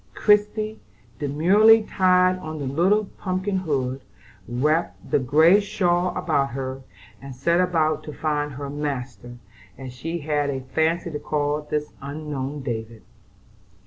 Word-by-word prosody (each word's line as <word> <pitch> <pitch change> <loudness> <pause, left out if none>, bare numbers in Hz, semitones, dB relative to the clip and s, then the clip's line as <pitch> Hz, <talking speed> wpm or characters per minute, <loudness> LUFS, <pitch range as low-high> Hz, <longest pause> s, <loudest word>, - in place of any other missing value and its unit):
Christie 210 +1 +2 0.4
demurely 195 +10 +5
tied 185 -2 +3
on 155 -2 -6
the 145 - -4
little 180 +10 +2
pumpkin 190 +1 -1
hood, 135 -7 -2 0.5
wrapped 150 +8 -1
the - - +4
gray 155 +9 +5
shawl 180 -3 +1
about 140 -4 +1
her, 130 0 -4 0.4
and 135 -1 -9
set 170 +7 +2
out 155 -1 +1
to 150 - -6
find 150 -1 -2
her 140 +2 -6
"master," 130 -5 -5 0.4
as 130 -2 -8
she 165 +7 -4
had 145 -1 0
a 135 -1 -3
fancy 160 +6 -1
to 150 - -4
call 145 0 -1
this 150 0 -4
unknown 145 -1 -5
David. 115 -3 -5
150 Hz, 135 wpm, -23 LUFS, 135-175 Hz, 0.5 s, demurely